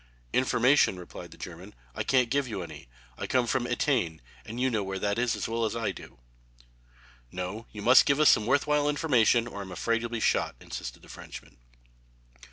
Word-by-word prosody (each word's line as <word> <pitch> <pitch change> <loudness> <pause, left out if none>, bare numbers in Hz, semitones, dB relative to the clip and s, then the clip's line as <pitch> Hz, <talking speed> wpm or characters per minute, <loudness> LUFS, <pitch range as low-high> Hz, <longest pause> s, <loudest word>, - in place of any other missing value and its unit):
"Information," 130 -4 +3
replied 90 - -10
the - - -14
German, 90 +4 -9 0.2
"I - - -4
can't 125 -3 +2
give 140 -1 +1
you 100 -6 -4
any. 75 -5 -10 0.3
I - - -3
come 125 -2 +2
from 120 +1 0
Etain, 120 - 0 0.3
and 115 +3 -6
you 130 0 +1
know 110 -3 0
where 95 0 -4
that 100 +3 -1
is 120 -1 +1
as - - -3
well 115 +1 -1
as 110 - -1
I 115 -2 -1
do." - - -12 1.1
"No, 90 +5 -5
you 105 -1 -8
must 125 +3 +7
give 140 +1 +3
us 155 - +7
some 110 - +4
worth 140 +2 +3
while 150 -1 +2
information, 125 -6 +3
or 100 -4 -7
I'm 95 -1 -8
afraid 115 +5 0
you'll 120 - -4
be 120 -1 -3
shot," - - +1
insisted - - -8
the - - -15
Frenchman. - - -11
115 Hz, 200 wpm, -28 LUFS, 100-130 Hz, 1.1 s, must